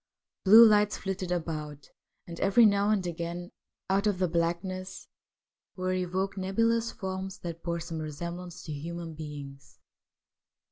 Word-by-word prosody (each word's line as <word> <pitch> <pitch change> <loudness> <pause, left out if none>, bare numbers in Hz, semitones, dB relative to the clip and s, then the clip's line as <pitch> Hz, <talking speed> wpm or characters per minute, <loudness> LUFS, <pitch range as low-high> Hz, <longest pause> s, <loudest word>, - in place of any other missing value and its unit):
Blue 220 +4 +10
lights 210 -1 +4
flitted 190 -2 -4
about, 155 -4 -4 0.3
and 170 -1 -8
every 200 +4 +5
now 200 0 +3
and 205 -4 +1
again, 175 +1 -4 0.4
out 195 +2 +2
of 205 -3 +1
the 185 0 +1
blackness, 175 +3 -2 0.7
were 185 0 -1
evoked 185 +2 -2
nebulous 230 +4 +1
forms 190 0 -5
that 170 -1 -6
bore 170 0 -2
some 165 -1 -5
resemblance 170 +3 -6
to 155 - -7
human 165 +2 -6
beings. 145 -3 -9
180 Hz, 135 wpm, -29 LUFS, 165-195 Hz, 0.7 s, Blue